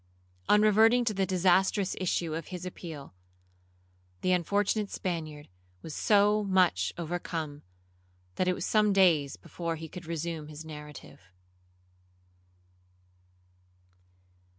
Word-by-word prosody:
On 210 0 +6
reverting 225 +3 +5
to 220 - +1
the 195 -1 0
disastrous 190 +1 +2
issue 170 -3 -1
of 165 +1 -5
his 180 -1 -7
appeal, 160 - -8 1.1
the 185 - +1
unfortunate 200 +4 +1
Spaniard 155 -5 -4 0.4
was 160 - -7
so 210 +3 +3
much 180 - +2
overcome, 165 -3 -4 0.7
that 180 - -1
it 180 - +2
was - - -4
some 210 -2 +3
days 165 -8 +3
before 170 -1 -5
he 160 0 -8
could 175 +1 -10
resume 165 -1 -4
his 155 +1 -9
narrative. 150 -6 -10
175 Hz, 110 wpm, -29 LUFS, 160-195 Hz, 1.1 s, On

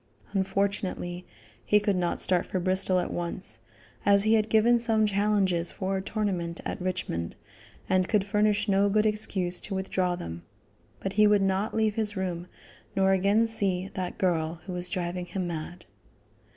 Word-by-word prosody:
Unfortunately, 190 -2 -1 0.4
he 210 - +4
could 205 -1 +1
not 175 -1 -1
start 180 -2 +1
for 185 - -2
Bristol 185 +1 +1
at 180 - -1
once, 175 +2 -4 0.4
as 200 0 +5
he 215 +1 +3
had 220 -1 +2
given 235 +2 +4
some 225 -2 +3
challenges 200 -4 +1
for 195 -1 -2
a - - -2
tournament 190 -5 -2
at - - -4
Richmond, 180 - -3 0.5
and 185 -1 +2
could 210 -3 +2
furnish 210 +1 +1
no 200 0 +3
good 215 +2 +2
excuse 195 -4 0
to 200 - -5
withdraw 185 -1 0
them; 85 - -7 0.6
but 195 - -3
he 210 +1 +5
would 205 -1 +4
not 195 +2 0
leave 220 -1 +2
his 210 -2 -2
room, 180 -2 -3 0.5
nor 195 0 +3
again 200 +4 +3
see 195 -4 -1
"that 185 -1 -4
girl 165 -3 0
who 185 +1 -6
was 180 0 0
driving 180 0 -3
him 185 -1 -3
mad." 170 +1 -6
190 Hz, 165 wpm, -28 LUFS, 180-210 Hz, 0.6 s, as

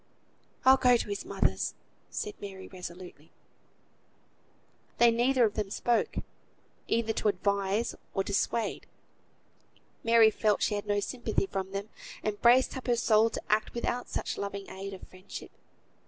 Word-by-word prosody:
"I'll 265 +1 +8
go 250 -2 +5
to 220 - -4
his 200 0 -4
mother's," - - 0 0.3
said 425 -2 -4
Mary, 190 -2 -8
resolutely. 180 -3 -10 1.7
They 235 0 +6
neither 245 +2 +3
of 210 - 0
them 210 -2 -2
spoke, 235 +3 0 0.7
either 225 -1 +1
to 215 - -1
advise 200 +2 0 0.2
or 195 - +2
dissuade. 205 +3 -1 1.2
Mary 230 -1 +6
felt 210 -1 +1
she - - +1
had 205 0 -3
no 205 0 +1
sympathy 235 -2 -1
from 195 0 -4
them, 200 +2 -4 0.3
and 210 -1 -2
braced 250 +3 +5
up 260 - -7
her 240 - +3
soul 225 -1 +4
to - - -5
act 215 +2 +1
without 240 +1 -2
such - - -3
loving 200 -1 -4
aid 195 +1 -6
of 185 - -13
friendship. 185 +1 -10
215 Hz, 145 wpm, -30 LUFS, 195-235 Hz, 1.7 s, I'll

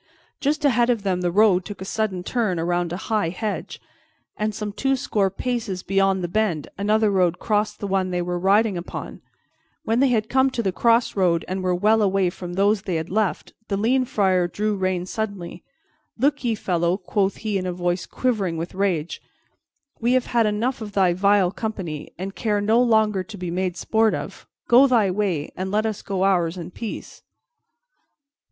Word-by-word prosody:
Just 295 +1 0
ahead 240 -3 +3
of 230 -4 +1
them 185 -2 0
the 175 - +1
road 190 -1 +4
took 205 +1 -8
a 190 - -6
sudden 195 -3 -2
turn 215 -5 -1
around 175 0 -1
a 175 - -3
high 210 -3 -1
hedge, 205 +4 -4 0.6
and 215 0 -1
some 210 -1 -4
twoscore 235 -6 0
paces 205 -3 -3
beyond 195 -1 +1
the - - -1
bend 175 -5 -1
another 210 +1 +2
road 180 -2 +2
crossed 210 +1 -1
the - - -4
one 190 -1 0
they 180 -1 -1
were 175 0 -2
riding 200 +1 +3
upon. 170 - -7 0.6
When 225 +2 +1
they 275 - +5
had 220 -4 +1
come 265 +2 +3
to 240 -3 -3
the 190 - +1
crossroad 195 -6 +2
and 185 +1 -3
were 180 -1 +1
well 215 +4 +3
away 195 -3 +2
from 175 -1 -7
those 200 +2 +2
they 185 -3 -3
had 160 +2 -3
left, 210 -1 -1
the 200 - -1
lean 255 +5 +2
Friar 190 -8 +2
drew 210 +4 -1
rein 185 -2 -1
suddenly. 200 -4 -5 0.5
"Look 285 +4 +1
ye, 235 -2 +1
fellow," 175 -2 0
quoth 195 +1 -1
he 210 -3 -2
in 185 - -4
a - - -1
voice 175 0 -2
quivering 205 -10 -1
with 165 +2 -5
rage, 185 -5 -1 0.8
"we 240 +2 +2
have 255 -1 +2
had 230 -2 +2
enough 230 +5 -1
of 210 -2 -7
thy 185 -3 +3
vile 195 0 +3
company, 190 -8 -5
and 190 +2 -5
care 210 -1 0
no 220 +4 +3
longer 220 -5 +3
to 205 +3 -9
be 180 -2 -4
made 180 0 -2
sport 220 +4 +2
of. - - -7 0.2
Go 255 +4 +7
thy 225 -7 +3
way, 180 -7 -1
and 185 +1 -3
let 210 +2 +1
us 215 -2 -2
go 190 -1 -2
ours 180 -3 +2
in 175 0 -7
peace." 225 +3 -7
200 Hz, 190 wpm, -23 LUFS, 180-220 Hz, 0.8 s, Go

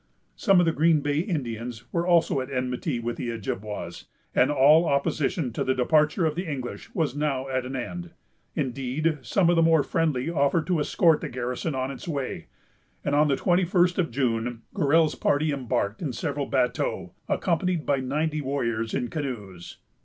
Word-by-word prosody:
Some 195 -4 +4
of 175 - +4
the 165 - +3
Green 160 -1 +3
Bay 145 +1 0
Indians 120 - -3
were 170 +1 0
also 170 -6 +3
at 130 - -6
enmity 125 +1 -2
with 120 0 -3
the 120 - -3
Ojibwas, 105 -5 -5 0.3
and - - +4
all 150 +4 +5
opposition 140 -1 0
to - - -1
the 130 - +1
departure 150 +6 +2
of 155 - +1
the 170 0 -4
English 130 -3 -6
was 150 -5 0
now 140 -3 -1
at 130 -1 -1
an 135 - -5
end. 175 +7 -5 0.5
Indeed, 140 +2 -1
some 165 - +1
of 175 - +4
the 165 - +4
more 160 -2 +4
friendly 155 -6 0
offered 160 0 +1
to 180 -2 +1
escort 160 +2 +3
the - - -4
garrison 125 +4 -3
on 130 +1 -2
its 135 - -9
way; 140 -5 -4 0.6
and 145 - 0
on 150 +1 +4
the 140 - +2
twenty 180 +6 +2
first 180 0 +2
of 170 - +1
June, 120 -2 -1
Gorell's 160 -2 +3
party 150 +2 +1
embarked 120 -6 -2
in 145 -7 -2
several 140 +3 -3
bateaux, 125 -3 -1 0.2
accompanied 175 -1 0
by 140 - +2
ninety 150 +4 -1
warriors 115 -5 -2
in 120 - -1
canoes. 105 - -6
140 Hz, 180 wpm, -26 LUFS, 125-165 Hz, 0.6 s, all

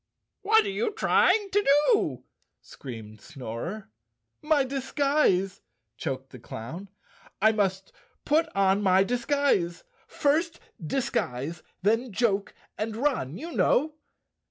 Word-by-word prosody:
"What 435 +1 +4
are 400 - -2
you 455 +2 -1
trying 415 -1 +3
to 410 +1 +2 0.3
do?" 425 - 0 0.4
screamed 110 -5 -10
Snorer. 130 - -7 0.5
"My 300 -2 +3
disguise," 270 -7 +1 0.3
choked 135 -3 -5
the 125 - -11
clown. 155 - -8 0.5
"I 220 +2 +5
must 195 -3 -1 0.3
put 320 +2 +2
on 195 0 +3
my 190 -1 +4
disguise—first 280 - 0 0.2
disguise, 155 - -2 0.2
then 225 +4 +1
joke 200 -1 0 0.2
and 215 0 -2
run, 230 - -1
you 335 +3 -7
know!" 305 0 +2
215 Hz, 110 wpm, -27 LUFS, -, 0.5 s, I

